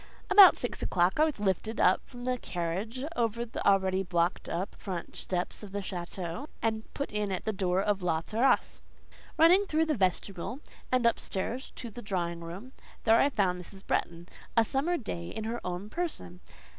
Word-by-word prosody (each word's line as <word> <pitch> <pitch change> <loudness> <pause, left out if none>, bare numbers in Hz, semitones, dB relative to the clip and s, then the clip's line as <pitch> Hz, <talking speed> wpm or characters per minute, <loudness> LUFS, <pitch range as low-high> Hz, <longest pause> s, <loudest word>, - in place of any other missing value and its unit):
About 390 -2 +10
six 245 - -2
o'clock 180 +7 +2
I 310 - +6
was 310 -8 -3
lifted 210 +3 -1 0.3
from 245 -1 -10
the 250 -1 0
carriage 190 +10 -3
over 235 -1 0
the 230 - -5
already 190 -1 +3
blocked 175 -1 0
up 180 +4 -3
front 180 -4 -5
steps 180 -1 -3
of 200 -2 -10
the 205 - -1
château, 180 - -5
and 220 -1 -2
put 280 - -3
in 210 -1 -1
at 185 - -3
the 220 - 0
door 190 -1 +1
of 205 -2 0
La 165 -3 +1
Terrasse. 235 +8 +1 0.6
Running 360 +5 +6
through 315 -1 +2
the 315 - +1
vestibule, 195 - -1 0.3
and 255 -2 +2
up 235 - +3
stairs 230 +7 -3
to 235 - -7
the 240 - -8
drawing 175 -5 -2
room, 175 +9 -8 0.3
there 225 0 +5
I 280 - +4
found 185 -8 0
Mrs. 195 +2 -13
Bretton—a 175 +6 -1
summer 290 +9 0
day 85 - -5
in 220 - -5
her 230 +2 -3
own 180 +2 -4
person. 210 - -4
205 Hz, 180 wpm, -30 LUFS, 180-245 Hz, 0.6 s, About